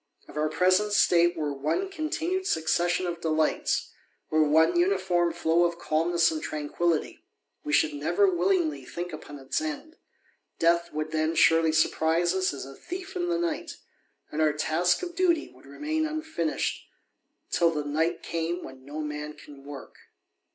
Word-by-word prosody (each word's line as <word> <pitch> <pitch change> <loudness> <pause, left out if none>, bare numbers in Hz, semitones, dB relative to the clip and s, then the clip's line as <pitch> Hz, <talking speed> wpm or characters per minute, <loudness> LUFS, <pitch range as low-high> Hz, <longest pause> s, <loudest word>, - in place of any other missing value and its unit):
" - - -34
If - - -13
our 155 0 0
present 185 +6 +2
state 175 -2 +4
were 150 -2 -1
one 150 - -1
continued 365 +2 -2
succession 175 +3 +1
of 170 -1 -4
delights, 160 -1 0 0.4
or 155 0 +4
one 155 - +4
uniform 180 - +2
flow 165 +1 +2
of 170 0 -1
calmness 170 +1 +2
and 155 -1 -3
trajiquillity, 155 +2 -1 0.4
we 300 - -4
should 320 0 +3
never 400 +7 +2
willingly 365 -3 +1
think 175 0 -6
upon 145 -1 -8
its 135 - -2
end; 315 +1 -5 0.6
death 170 +1 +2
would 155 +1 -3
then 160 +1 0
surely 165 -1 +5
surprise 160 +2 +2
us 190 -1 +1
as 140 - -6
"a 135 - -10
thief 370 - -8
in 350 -1 -1
the 345 - +1
^ight; 340 -1 -2 0.3
*' - - -41
and 155 - -1
our 155 -1 +3
task 170 - +1
of 350 -1 -5
duty 345 -3 +1
would 130 +2 -18
remain 310 - -2
unfinished, 310 - -2 0.7
till 170 -1 +3
tlie 150 -2 -3
night 160 +4 -1
came 170 +2 -3
when 130 0 -11
no 145 +3 -6
man 150 0 -5
can 145 -2 -14
work." 140 -1 -9
170 Hz, 165 wpm, -27 LUFS, -, 0.7 s, surely